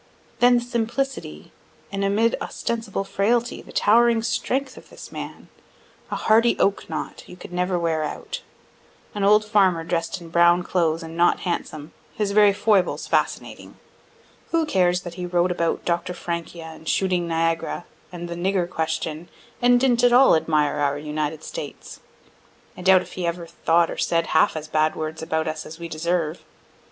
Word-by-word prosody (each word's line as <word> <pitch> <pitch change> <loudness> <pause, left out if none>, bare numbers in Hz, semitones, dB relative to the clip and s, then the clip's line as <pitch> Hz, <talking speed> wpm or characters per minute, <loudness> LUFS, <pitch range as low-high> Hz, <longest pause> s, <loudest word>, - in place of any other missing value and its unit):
Then 245 0 +6
the - - 0
simplicity 235 - -3 0.4
and 200 0 -2
amid 215 +4 +2
ostensible 225 -4 -3
frailty 215 +5 0
the - - -14
towering 230 +1 +4
strength 255 +3 -1
of - - -14
this - - -11
man - - -8 0.6
a - - -3
hardy 230 +2 +3
oak 200 - 0
knot, - - -5
you 180 - -12
could 180 - -11
never 180 0 0
wear 165 -2 0
out 150 - -5 0.7
an 205 -2 -3
old 210 +2 +5
farmer 190 -6 +3
dress'd 170 +2 -2
in 170 -1 -11
brown 175 +1 +4
clothes, 165 -2 0
and 165 0 -8
not 170 +1 +3
handsome 155 -4 -4 0.2
his 210 -2 -1
very 205 0 +6
foibles 200 -2 +1
fascinating. - - -2 0.7
Who 330 -1 +1
cares 180 -8 +2
that 175 -2 -8
he 180 - -3
wrote 175 0 +1
about 170 -2 -1
Dr. 175 +1 -1
Francia, 170 -1 -5
and 160 0 -8
"Shooting 180 -3 +1
Niagara" 165 +1 -1 0.3
and 175 -1 -6
"the 170 - -5
Nigger 180 +1 0
Question," 160 0 -3 0.3
and 245 0 +5
didn't 245 -2 +2
at 245 - +6
all 255 -2 +7
admire 150 -2 +1
our 145 -1 0
United 150 +1 -3
States? - - -8 0.8
(I - - -10
doubt 185 0 +5
if - - -14
he 180 -2 -3
ever 170 0 -3
thought 170 0 +1
or - - -6
said 165 -1 +1
half 160 - +4
as 155 -1 -5
bad 155 0 +1
words 155 0 -5
about 160 -1 -1
us 155 0 -3
as 160 - -10
we 170 0 -6
deserve.) 165 0 -2
175 Hz, 170 wpm, -23 LUFS, 165-210 Hz, 0.8 s, all